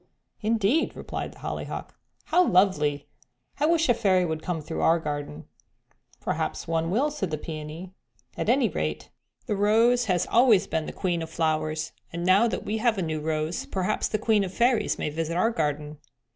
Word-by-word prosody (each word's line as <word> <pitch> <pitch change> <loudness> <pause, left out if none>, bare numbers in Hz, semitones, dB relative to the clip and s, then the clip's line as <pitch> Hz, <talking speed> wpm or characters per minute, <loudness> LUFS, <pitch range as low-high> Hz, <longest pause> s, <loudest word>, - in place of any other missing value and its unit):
'" - - -43
"Indeed!" 230 +7 +2
replied - - -5
the - - -18
Hollyhock. - - -5 0.3
"How 360 - +3
lovely; 150 - +2 0.5
I 295 - +3
wish 330 -1 +3
a 245 - +5
fairy 195 -6 +2
would 160 -2 -3
come 175 -1 -2
through 155 +2 -5
our 165 - +4
garden." 145 - -5 0.7
"Perhaps - - -3
one 165 0 0
will," 265 +11 +1
said 200 - -3
the 155 - -2
Peony. 155 +4 -7 0.4
"At - - -2
any 250 0 +4
rate 75 - -3 0.3
the 210 - -1
Rose 230 +4 +3
has 180 -5 +1
always 235 -5 +5
been 160 -1 -2
the - - -4
queen 175 -3 -1
of 160 - -5
flowers, 155 -1 -1 0.2
and 170 +1 -4
now 195 +6 +5
that - - -3
we 220 +1 -2
have 230 -1 +2
a 190 - 0
new 160 -1 -2
rose 155 +1 -2
perhaps 185 -1 -1
the 215 - -1
Queen 215 -1 +2
of 190 - -3
the 185 - -14
Fairies 240 -1 +2
may 150 - -2
visit 165 +2 -2
our 225 +6 +3
garden." 150 -4 -2
180 Hz, 190 wpm, -26 LUFS, 155-220 Hz, 0.7 s, a